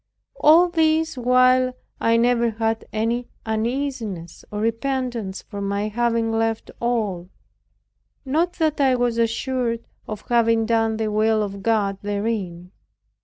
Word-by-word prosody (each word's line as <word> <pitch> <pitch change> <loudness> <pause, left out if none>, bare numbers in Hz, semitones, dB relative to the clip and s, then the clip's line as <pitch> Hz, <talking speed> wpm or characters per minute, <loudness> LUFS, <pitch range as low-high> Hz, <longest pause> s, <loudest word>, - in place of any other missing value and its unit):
All 330 +4 +6
this 320 -2 +2
while 255 +1 +3 0.3
I 230 0 +3
never 235 0 +3
had 225 0 -2
any 230 +3 -1 0.2
uneasiness 220 -6 -3
or 210 - -5
repentance 230 -3 -2
for 200 - -7
my 200 +1 -1
having 230 0 0
left 225 0 -1
at - - -24
all; 210 -7 -1 1.0
not 325 +6 +1
that 310 -4 0
I 265 -2 +4
was 245 -1 0
assured 230 0 -1 0.2
of 215 -2 -5
having 230 -1 +3
done 225 -1 +1
the 220 -1 -1
will 215 0 +2
of 200 -1 -6
God 200 -3 +1
therein. 200 -4 -3
230 Hz, 130 wpm, -22 LUFS, 215-250 Hz, 1.0 s, All